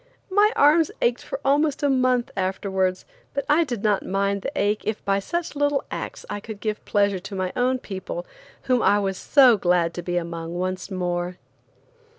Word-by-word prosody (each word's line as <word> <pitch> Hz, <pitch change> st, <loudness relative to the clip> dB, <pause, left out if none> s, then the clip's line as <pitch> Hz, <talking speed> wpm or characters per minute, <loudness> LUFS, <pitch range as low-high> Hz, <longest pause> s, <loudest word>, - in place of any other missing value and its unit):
My 415 Hz, +2 st, +5 dB
arms 305 Hz, +2 st, +5 dB
ached 240 Hz, 0 st, +1 dB
for -, -, -6 dB
almost 290 Hz, +1 st, +2 dB
a -, -, +4 dB
month 255 Hz, -2 st, +2 dB
afterwards, 190 Hz, -1 st, -1 dB, 0.3 s
but 280 Hz, -1 st, -1 dB
I 305 Hz, +3 st, +4 dB
did 240 Hz, -9 st, -5 dB
not 210 Hz, -2 st, +2 dB
mind 200 Hz, +1 st, 0 dB
the -, -, -3 dB
ache 205 Hz, +1 st, +1 dB
if 215 Hz, -, -3 dB
by 195 Hz, 0 st, +2 dB
such 340 Hz, -, -3 dB
little 290 Hz, -1 st, +1 dB
acts -, -, -6 dB
I 205 Hz, -, -4 dB
could 210 Hz, 0 st, -8 dB
give 215 Hz, -1 st, -3 dB
pleasure 200 Hz, -2 st, +1 dB
to 195 Hz, +2 st, -8 dB
my 185 Hz, -1 st, -2 dB
own 255 Hz, +1 st, +2 dB
people, 250 Hz, -, -6 dB, 0.4 s
whom 250 Hz, -2 st, +2 dB
I 205 Hz, -, +4 dB
was 195 Hz, -2 st, -1 dB
so 255 Hz, -2 st, +5 dB
glad 175 Hz, -2 st, +2 dB
to 175 Hz, -, -5 dB
be 175 Hz, 0 st, -2 dB
among 170 Hz, 0 st, -4 dB
once 185 Hz, +1 st, -3 dB
more. 180 Hz, -1 st, -2 dB
205 Hz, 185 wpm, -24 LUFS, 185-260 Hz, 0.4 s, My